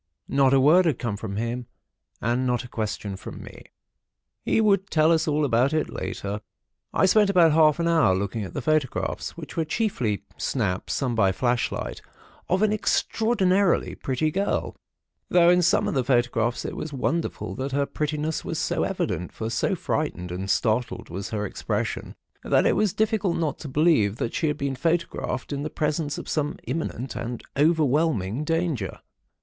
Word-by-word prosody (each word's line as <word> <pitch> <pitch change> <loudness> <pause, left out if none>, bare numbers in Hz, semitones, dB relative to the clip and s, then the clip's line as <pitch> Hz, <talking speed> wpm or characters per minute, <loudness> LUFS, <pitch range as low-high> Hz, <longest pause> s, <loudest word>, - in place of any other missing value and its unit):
Not 135 -1 +3
a 135 - +5
word 160 +7 +6
had 145 -6 +1
come 115 -5 -2
from 100 -1 -5
him, 120 +3 -3 0.5
and 120 +2 0
not 125 -1 0
a - - -9
question 105 -3 -4
from - - -9
me. - - -12 0.8
He - - +2
would 200 -3 +3
tell 155 0 +4
us 165 0 +2
all 150 0 +2
about 130 +2 +2
it 155 - 0
later. 100 +1 -4 0.5
I - - +3
spent 205 +2 +4
about 175 -4 +5
half 155 0 +4
an 170 - +1
hour, 160 - +4
looking 100 +3 -2
at 95 - -8
the 140 - -3
photographs, 155 -2 -1
which - - -8
were 165 - +1
chiefly 155 - -1
"snaps" 100 -8 -1
(some 130 -4 -1
by 100 -4 +3
flashlight) 120 +5 -1 0.5
of 185 +4 +2
an 215 -1 +3
extraordinarily 200 -3 +2
pretty 145 +4 -1
girl; 195 +5 -1 0.5
though 175 -1 +6
in 180 0 +4
some 175 - +3
of - - -1
the 135 -3 +1
photographs 120 -2 +1
it - - -4
was 155 - -5
wonderful 160 +5 -2
that 135 +1 -3
her 140 +1 +1
prettiness 150 +2 -2
was - - -4
so - - 0
evident, 90 - -2
for 110 0 -5
so 115 - 0
frightened 90 0 -2
and 95 +2 -4
startled 115 +4 0
was 95 +3 -5
her 105 -1 -2
expression, - - -3 0.3
that - - +3
it - - +3
was 210 -3 +2
difficult 215 -4 0
not 160 -3 -1
to 155 - -7
believe 140 - +3
that 115 - -3
she 160 - 0
had 150 -1 -1
been 140 -2 -2
photographed 165 +1 -1
in 140 - -3
the 155 - -3
presence 150 0 -1
of - - -7
some 150 -1 -1
imminent 130 -2 -4
and 120 0 -5
overwhelming 150 - +2
danger. 165 - -1
145 Hz, 175 wpm, -25 LUFS, 115-165 Hz, 0.8 s, word